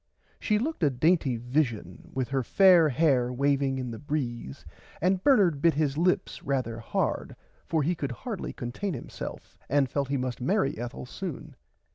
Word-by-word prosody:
She 210 - +1
looked 295 +5 -2
a 150 - +4
dainty 140 -1 +2
vishen 120 - -1
[Pg - - -17
80] - - -18
with 130 -2 0
her 135 -1 0
fair 175 - +6
hair 130 -3 +2
waving 135 +1 +1
in 125 -2 -4
the 115 - -7
breeze 125 - -4 0.3
and 185 +2 +1
Bernard 190 - +4
bit 165 -2 +4
his 145 -2 +1
lips 175 +4 +1
rarther 125 -4 -2
hard 115 - -2 0.3
for 160 -2 +1
he 170 +5 +1
could 140 -6 -4
hardly 210 - -5
contain 135 +10 -4
himself 120 - -8
and 140 0 +3
felt 140 -2 -1
he 140 +1 0
must 125 -2 -3
marry 170 0 +1
Ethel 120 +2 -5
soon. 170 +3 -7
140 Hz, 175 wpm, -28 LUFS, 125-170 Hz, 0.3 s, fair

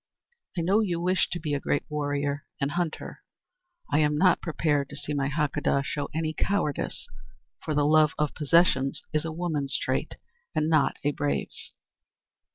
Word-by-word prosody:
I - - +1
know 190 +6 +3
you 180 -6 0
wish 185 +2 +2
to 175 - -3
be 150 -3 -2
a 145 - +1
great 140 - 0
warrior 145 -1 -2
and 140 0 0
hunter. 170 0 -3 0.7
I 145 - +4
am 150 -1 +2
not 185 +3 +4
prepared 150 -4 0
to 140 - -8
see 150 +1 -3
my 140 -1 0
Hakadah 145 -2 +1
show 145 -1 -3
any 155 0 -1
cowardice, 160 -6 -1 0.6
for 155 - -2
the 145 0 +3
love 155 0 +5
of 150 -1 0
possessions 150 -3 +3
is 155 +1 +1
a 165 - -2
woman's 155 -5 -1
trait - - -2 0.4
and 155 0 +2
not 155 -3 +3
a 145 - +2
brave's." 145 0 -3
150 Hz, 165 wpm, -27 LUFS, 145-165 Hz, 0.7 s, love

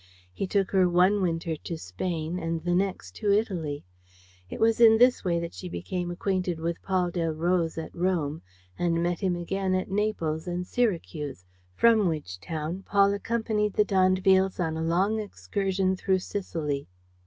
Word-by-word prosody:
He 190 - -3
took 195 -1 0
her 185 -2 +4
one 185 +4 +4
winter 165 -2 -1
to 165 +2 -6
Spain 160 - -3
and 165 -1 -3
the 175 0 0
next 190 +1 -1
to 210 -2 +1
Italy. 175 - -1 0.6
It - - -7
was 225 +1 +3
in 225 -1 +8
this 245 +2 +4
way 170 -3 +1
that 170 0 -5
she 180 - -7
became 180 0 -4
acquainted 180 -1 -1
with 170 +1 -3
Paul 185 -2 0
Delroze 165 0 0
at 160 - -5
Rome 170 -4 -1 0.4
and 170 -1 +1
met 175 0 0
him 185 -3 0
again 185 +2 -1
at 185 +1 -2
Naples 185 -6 -1
and 175 0 -2
Syracuse, 165 - -2 0.3
from 225 -4 +5
which 150 - -3
town 160 - -4
Paul 200 0 +3
accompanied 210 -1 -1
the 210 - +3
d'Andevilles 190 0 +3
on 160 -3 0
a 160 - -3
long 185 +7 +1
excursion 190 - -1
through 190 0 +1
Sicily. 160 -7 -3
180 Hz, 165 wpm, -27 LUFS, 165-195 Hz, 0.6 s, in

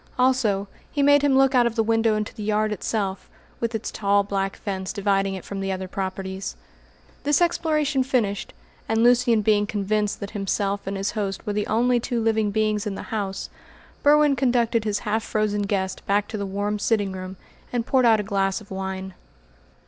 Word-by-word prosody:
Also, 250 -6 +2 0.2
he 285 - +1
made 285 0 +6
him 280 -2 +3
look 270 0 +4
out 245 -2 +5
of 235 - -4
the 225 - +2
window 225 0 +2
into 215 0 -3
the 220 - -9
yard 215 +1 +1
itself, 200 -1 -3 0.3
with 230 0 -2
its 220 - -3
tall 200 0 +2
black 195 -1 -2
fence 190 -2 -4
dividing 195 -1 0
it 185 - -8
from 200 - -5
the 195 0 -2
other 190 0 -3
properties. 190 0 -4 0.7
This 290 0 +3
exploration 305 -5 +1
finished, 230 -7 -1 0.4
and 225 +1 +2
Lucian 240 -2 +4
being 210 -1 +3
convinced 210 0 -1
that 200 - -6
himself 200 -1 -2
and 195 0 -2
his 195 +1 -1
host 200 -2 -3
were 210 - -2
the 210 0 -1
only 240 +2 +2
two 235 0 -2
living 220 -2 +1
beings 215 0 0
in 200 - -3
the - - -8
house, 195 -3 -3 0.5
Berwin 295 -1 +5
conducted 240 -4 +1
his 210 -1 0
half 215 +1 +1
frozen 215 -2 0
guest 195 -2 -2
back 205 +1 +2
to 220 - -4
the 200 - -3
warm 205 +2 -2
sitting 205 -2 +1
room 185 0 -7 0.3
and 240 -2 -1
poured 255 -2 +3
out 220 -2 +5
a - - -1
glass 195 -1 0
of 210 -2 -16
wine. 190 0 -4
210 Hz, 195 wpm, -24 LUFS, 195-235 Hz, 0.7 s, made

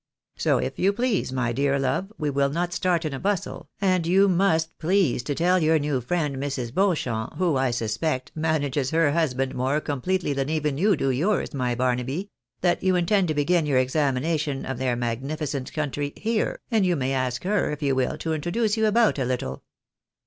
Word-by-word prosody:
So, - - +2
if 130 +1 -3
you 195 +2 +3
please, 240 - 0
my 125 -2 -1
dear 140 +2 +1
love, 135 +9 -1
we 150 -1 -1
wOl 140 0 +2
not 175 +4 -2
start 175 -2 0
in 150 - -2
a 135 - -4
bustle, 200 -2 -2
and 185 -4 +1
you 195 +3 +5
must 170 -3 +2
please 175 -6 +2
to 145 +4 -3
teU 180 +4 +3
your 160 -1 +3
new 145 -3 -1
friend, 150 +1 -1
Mrs. 130 -4 -3
Beau 190 0 +3
champ, 115 -6 -4
who, 175 -5 +1
I 130 -1 +2
suspect, 120 +4 -2
manages 145 -4 0
her 160 -2 +3
husband 135 -5 0
more 130 +4 0
completely 150 +3 -1
than 135 +1 -2
even 150 -3 -1
you 200 +2 +4
do 135 -3 0
yours, 165 +12 0
my 125 -3 -1
Barnaby, 130 - -1 0.3
that 175 -1 +2
you 185 -1 +2
intend 180 +2 +2
to 155 - -1
begin 150 +2 +2
your 140 -3 +2
examination 140 +2 0
of 130 -1 -4
their 130 -2 0
magnificent 135 +4 -3
country 145 -1 -2
Tiere, 220 +8 -1
and 220 -3 +3
you 180 -2 +2
may 135 -2 -1
ask 130 -2 -1
her, 205 +1 +1
if 150 -1 -4
you 140 -1 +2
will, 130 -1 0
to 160 - -2
introduce 205 +8 0
you 220 0 +3
about 220 -6 +3
a - - +1
Httle. 120 - -3
150 Hz, 200 wpm, -25 LUFS, 130-175 Hz, 0.3 s, you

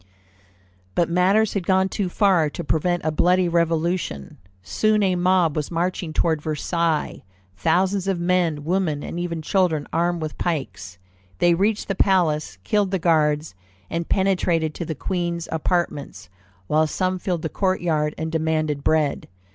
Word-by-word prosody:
But 170 -1 +1
matters 195 +5 +3
had 190 -4 -3
gone 190 0 +3
too 190 -1 -2
far 180 -5 +3
to 170 - -6
prevent 175 +2 0
a 155 - +1
bloody 180 +3 +3
Revolution. 170 - -1 0.2
Soon 215 - +1
a 185 -2 +2
mob 180 -3 +2
was 150 -2 -2
marching 175 0 -2
toward 160 0 0
Versailles; 160 +1 -1 0.3
thousands 185 - +1
of 190 -3 0
men, 170 -4 +1
women, 165 -3 -1
and 170 - -5
even 170 -2 -3
children 165 -4 +1
armed 170 +1 +1
with 155 -1 -6
pikes. 100 - -3 0.4
They 175 - +4
reached 205 +5 0
the 195 - 0
palace, 165 - +1
killed 205 - +1
the 190 - 0
guards, 155 - +1 0.4
and 165 0 -3
penetrated 180 -5 +1
to 170 - -5
the 160 - -4
queen's 170 +1 -3
apartments, 150 - -2 0.4
while 155 +7 +2
some 185 +3 -1
filled 175 -3 -2
the - - 0
court 190 +2 0
yard 150 -3 0
and 160 0 -3
demanded 155 -3 -1
bread. 155 -2 +1
170 Hz, 155 wpm, -22 LUFS, 155-185 Hz, 0.4 s, They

